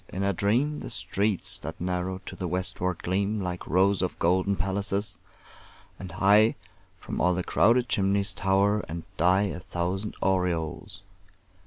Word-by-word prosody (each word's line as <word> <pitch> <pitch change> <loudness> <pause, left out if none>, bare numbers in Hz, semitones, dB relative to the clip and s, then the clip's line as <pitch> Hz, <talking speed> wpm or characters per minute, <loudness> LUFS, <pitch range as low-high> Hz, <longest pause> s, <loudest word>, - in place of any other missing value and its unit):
In 95 - -4
a 100 0 +1
dream 125 - +1
The - - -7
streets 100 0 +1
that - - -7
narrow 90 +1 -3
to - - -7
the 90 - -4
westward 90 0 -2
gleam 100 +4 0
Like 90 -2 -4
rows 95 +2 +2
of 95 - -2
golden 95 +3 +1
palaces; 100 0 -2 0.8
and 90 -3 -8
high 105 +4 +4 0.4
From - - -5
all 90 +1 +3
the 90 - -2
crowded 120 +7 +3
chimneys 100 -2 +1
tower 100 +3 +1
and 85 +1 -5
die 90 +4 +3
A - - -6
thousand 90 +4 -3
aureoles. 90 0 -1
95 Hz, 150 wpm, -27 LUFS, 90-100 Hz, 0.8 s, high